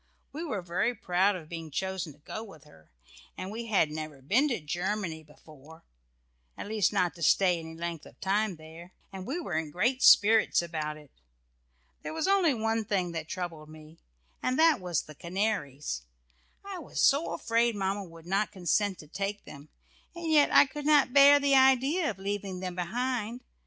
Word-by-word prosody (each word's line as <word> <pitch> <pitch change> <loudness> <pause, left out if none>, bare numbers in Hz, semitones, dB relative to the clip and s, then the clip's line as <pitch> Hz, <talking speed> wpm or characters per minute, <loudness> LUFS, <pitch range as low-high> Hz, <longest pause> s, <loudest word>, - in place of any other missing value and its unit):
We 310 +4 -5
were 215 - -4
very 185 +8 -1
proud 185 +2 +1
of 165 -4 -9
being 165 -1 -7
chosen 190 +1 -3
to - - -23
go 215 +8 -7
with 160 -10 -14
her, 80 -1 -20 0.5
and 185 - -6
we 230 +2 -6
had 190 -8 +2
never 155 -2 -6
been 215 - +2
to 245 -8 -1
Germany 175 +2 -3
before, 155 +1 -17 0.7
at - - -6
least 215 -1 +1
not 185 -4 +1
to 170 - -14
stay 180 0 +3
any 160 0 -9
length 170 -1 -5
of - - -18
time 200 0 0
there, 160 +3 -13 0.2
and 190 -1 -7
we 300 +7 -2
were 250 - -5
in 160 -1 -1
great 245 - 0
spirits 220 +1 +6
about 155 -3 -3
it. 150 -2 -16 0.9
There - - -6
was 320 +2 -1
only 380 -8 +3
one 225 0 -1
thing 190 -4 -1
that 160 -2 -5
troubled 165 -4 -6
me, 155 +1 -14 0.4
and 255 +1 0
that 325 -1 +5
was 180 -4 -2
about - - -22
the 155 - -13
canaries. 170 - -2 0.6
I 390 -2 -6
was 325 - -7
so 290 +4 +3
afraid 230 0 +1
Mamma 195 0 -2
would 165 -2 -14
not 195 +4 0
consent 190 +2 0
to 150 - -15
take 200 +5 -4
them, 145 +1 -12 0.5
and 335 -2 -3
yet 300 -2 +5
I - - +7
could 295 +1 -6
not 290 -4 +4
bear 285 +1 +8
the 280 -1 +2
idea 270 +5 +4
of - - -5
leaving 195 -1 -4
them 185 -1 -4
behind. 235 +6 -3
190 Hz, 190 wpm, -29 LUFS, 165-235 Hz, 0.9 s, bear